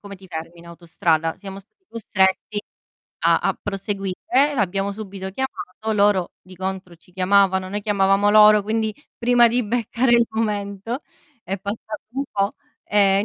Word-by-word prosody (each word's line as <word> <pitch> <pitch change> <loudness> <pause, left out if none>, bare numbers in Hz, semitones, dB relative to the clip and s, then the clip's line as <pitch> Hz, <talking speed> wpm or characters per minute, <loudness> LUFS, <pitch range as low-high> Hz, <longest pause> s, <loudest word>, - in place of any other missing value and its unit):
come 200 -1 -9
ti 190 -1 -15
fermi 165 +1 -7
in 170 - -15
autostrada? 165 -1 -1
Siamo 195 -1 -9
stati 215 - -20
costretti 205 -1 0 0.6
a - - +4
a - - -1
proseguire 195 -1 -4 0.4
e - - -5
l'abbiamo 200 -3 0
subito 195 -2 -7
chiamato, 220 -2 -5
loro 200 -3 +2
di 185 0 -14
contro 190 -1 -5
ci 170 +2 -24
chiamavano, 190 0 +2
noi 205 - -2
chiamavamo 200 -1 +2
loro, 210 0 +7
quindi 220 0 -1 0.2
prima 240 0 +4
di 245 +2 +1
beccare 235 +2 0
il 235 -1 +4
momento 210 +2 -3 0.4
è 190 +2 -3
passato 210 +2 -5
un 270 +3 -3
po'. 200 +1 0 0.3
Ehm, 200 -1 +3
200 Hz, 155 wpm, -22 LUFS, 190-215 Hz, 0.6 s, loro